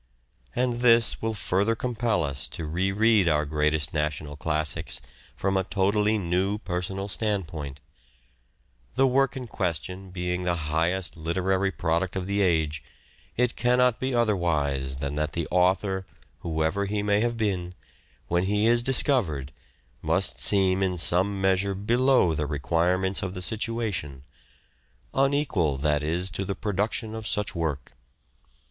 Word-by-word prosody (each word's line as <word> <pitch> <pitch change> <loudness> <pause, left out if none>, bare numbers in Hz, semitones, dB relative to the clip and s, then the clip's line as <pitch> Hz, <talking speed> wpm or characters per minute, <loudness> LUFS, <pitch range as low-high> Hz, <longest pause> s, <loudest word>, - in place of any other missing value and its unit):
And 125 -1 0
this 115 -2 +5
will 110 0 -1
further 100 +3 +1
compel 115 -4 0
us 70 -2 -3
to 80 - -6
re 90 +5 0
read 105 -2 +4
our 75 -1 +2
greatest 75 0 0
national 75 -1 -2
classics 80 +1 -1 0.4
from 95 0 -1
a 95 - +2
totally 105 +3 +1
new 95 +2 0
personal 95 0 -3
standpoint. 85 -9 -3 1.2
The 135 - +4
work 135 +1 +2
in 130 - -5
question 95 -1 -3
being 90 0 -3
the 90 -1 +1
highest 85 +3 -1
literary 95 +4 0
product 85 0 -1
of 95 -1 -2
the 100 +1 0
age, 80 -4 +1 0.5
it 125 0 +1
cannot 125 0 +3
be 130 -1 -1
otherwise 75 - 0
than 70 +1 -3
that 75 0 -1
the 85 -2 -2
author, 95 +1 +1 0.3
whoever 80 +4 -1
he 105 +1 -1
may 105 0 +2
have 120 0 0
been, 90 -5 -2 0.5
when 85 +4 +1
he 105 +2 +1
is 120 +1 +4
discovered 120 - +1 0.5
must - - 0
seem 95 -2 +3
in 95 -2 0
some 95 +4 +2
measure 95 +1 +1
below 120 -2 +3
the 75 -1 -2
requirements 85 +6 0
of 95 -1 -4
the 90 - -5
situation; 105 - -2 0.9
unequal, 135 - +1
that 75 +1 +1
is, 85 +4 -1
to 95 - -3
the 95 0 -3
production 105 +2 -2
of 110 -1 -5
such 105 -1 0
work. 80 -6 -3
95 Hz, 140 wpm, -26 LUFS, 80-105 Hz, 1.2 s, this